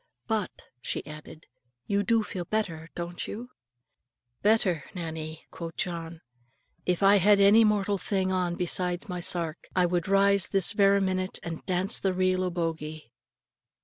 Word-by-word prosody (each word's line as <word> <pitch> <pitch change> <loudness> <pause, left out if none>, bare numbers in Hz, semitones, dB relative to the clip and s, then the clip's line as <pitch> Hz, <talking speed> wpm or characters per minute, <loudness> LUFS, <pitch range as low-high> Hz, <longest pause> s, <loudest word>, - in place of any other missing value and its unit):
"But," 215 -3 -2 0.2
she - - -3
added, 155 +1 -11 0.4
"you 200 0 +1
do 225 +2 +2
feel 180 -4 -5
better; 170 -6 -3
don't 175 0 -5
you?" 245 +4 -7 0.9
"Better! 200 -7 +3
Nannie," 160 -2 -6
quo' 170 - -6
John; 170 -3 -4 0.7
"if 180 +1 +1
I 200 +1 +7
had 200 +2 +5
any 205 +3 +7
mortal 205 -2 +1
thing 190 -1 -1
on 180 -2 0
besides 180 +3 -1
my 180 -2 -4
sark, 170 -2 -4
I 180 -1 +4
would 175 -1 -1
rise 195 0 +4
this 195 0 +2
vera 200 -1 +4
minute, 185 0 0
and 165 -1 -6
dance 185 +1 +3
the 190 -2 0
reel 185 0 +1
o' 180 - 0
Bogie." 160 -5 -4
185 Hz, 150 wpm, -27 LUFS, 170-200 Hz, 0.9 s, I